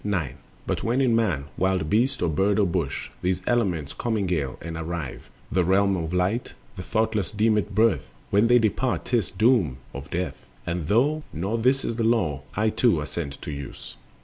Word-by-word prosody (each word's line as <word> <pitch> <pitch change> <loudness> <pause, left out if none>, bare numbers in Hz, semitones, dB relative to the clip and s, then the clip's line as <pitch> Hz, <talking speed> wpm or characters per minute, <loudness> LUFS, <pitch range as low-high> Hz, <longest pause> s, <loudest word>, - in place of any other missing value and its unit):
9. 90 -10 -1 0.3
But - - -2
when 120 +3 +1
in 125 -4 +3
man, 90 -12 +1
wild 95 -4 +1
beast, 115 - +1
or - - +2
bird, 95 +7 +2
or 105 - +4
bush, 85 -6 -2
These 90 0 0
elements 90 - 0
commingle 90 - -1
and 85 0 -6
arrive 80 -3 -5 0.2
The 90 - +3
realms 95 -1 +2
of 80 - -5
light, 90 +7 0 0.2
the - - -6
thoughtless 110 +1 0
deem 110 +1 +2
it 105 -1 -1
"birth"; 115 +1 +3 0.2
When 105 +3 +4
they 120 +1 +6
dispart, 120 +2 0
'tis 115 -9 +1
"doom 110 - +2 0.2
of 70 +1 -8
death;" 90 +2 -4 0.2
and 85 -3 -2
though 140 - +3
Not 100 +8 -2
this 130 +3 +3
the 115 0 -1
Law, 110 - +1
I 110 +2 +2
too 115 -10 +3
assent 75 -1 -5
to - - -4
use. 70 -1 -8
95 Hz, 180 wpm, -25 LUFS, 85-115 Hz, 0.3 s, they